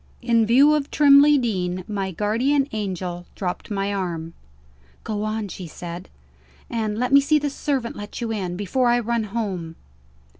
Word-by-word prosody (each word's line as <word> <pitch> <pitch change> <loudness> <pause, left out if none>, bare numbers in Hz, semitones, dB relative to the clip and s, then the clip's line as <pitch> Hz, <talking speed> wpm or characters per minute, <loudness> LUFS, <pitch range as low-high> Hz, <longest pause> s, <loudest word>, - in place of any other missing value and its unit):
In 230 -2 +3
view 275 +6 +6
of 295 -2 0
Trimley 290 0 +6
Deen, 185 -7 -1
my 195 -2 -2
guardian 240 - +1
angel 185 -4 -4
dropped 180 +2 -4
my 200 -1 -1
arm. 170 -4 -4 0.7
"Go 210 -1 -3
on," 215 0 -2
she 185 -2 -8
said, 175 +2 -8 0.6
"and 215 -3 -2
let 250 +3 -1
me 280 - +8
see 305 +2 +3
the 290 -1 -1
servant 270 -4 -2
let 205 0 -7
you 230 -1 -3
in, 180 -4 -3
before 225 +6 0
I 240 0 +4
run 235 -1 -1
home." 195 -7 -4
215 Hz, 160 wpm, -23 LUFS, 185-250 Hz, 0.7 s, me